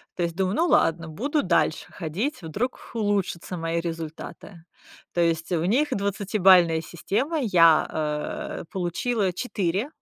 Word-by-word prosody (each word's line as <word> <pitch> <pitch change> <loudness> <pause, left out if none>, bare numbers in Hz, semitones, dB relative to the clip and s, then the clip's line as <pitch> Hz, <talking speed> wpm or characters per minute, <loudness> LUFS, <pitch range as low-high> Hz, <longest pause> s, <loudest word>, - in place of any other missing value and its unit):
То 180 - -4
есть 170 -1 -1
думаю: 190 +2 0
"Ну 340 +2 +2
ладно, 165 - +2
буду 280 - -1
дальше - - 0
ходить, 190 - -3
вдруг 215 +11 -4
улучшатся 200 -5 -1
мои 165 0 -1
результаты". 165 +1 -7 0.5
То 175 - +1
есть 165 0 0
у 165 -2 +1
них 265 +10 +2
двадцатибалльная 190 -5 +3
система, 265 - -2
я 165 -8 +5
а 150 -1 -3
получила 190 +2 -1
4 200 - -2
180 Hz, 130 wpm, -25 LUFS, 165-210 Hz, 0.5 s, я